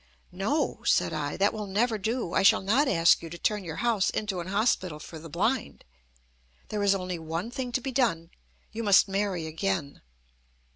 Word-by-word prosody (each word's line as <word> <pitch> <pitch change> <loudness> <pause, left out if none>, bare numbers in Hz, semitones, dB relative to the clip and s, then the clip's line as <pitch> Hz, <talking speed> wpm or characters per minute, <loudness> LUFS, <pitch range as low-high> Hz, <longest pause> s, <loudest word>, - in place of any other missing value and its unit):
"No," - - -1
said 90 - +2
I. 145 -1 -3
"That 200 +1 +2
will 210 -2 -5
never 220 +3 0
do. 220 -2 -2
I - - +3
shall 195 - +5
not 245 +10 +2
ask 165 -7 +4
you 165 - -8
to 170 - -8
turn 210 +2 -1
your 160 -3 -6
house 225 -5 +2
into 200 -4 -3
an 170 - -5
hospital 190 -5 0
for 160 +1 -9
the 165 +1 -10
blind. 220 - -1 0.8
There 210 -1 -2
is 200 -1 +3
only 180 -2 -4
one 165 +7 -4
thing 250 0 -4
to 255 - 0
be 270 +1 -4
done, 185 -11 0 0.4
you 225 - -5
must 205 -3 +5
marry 195 -4 -1
again." 160 -2 -3
195 Hz, 190 wpm, -27 LUFS, 170-220 Hz, 0.8 s, shall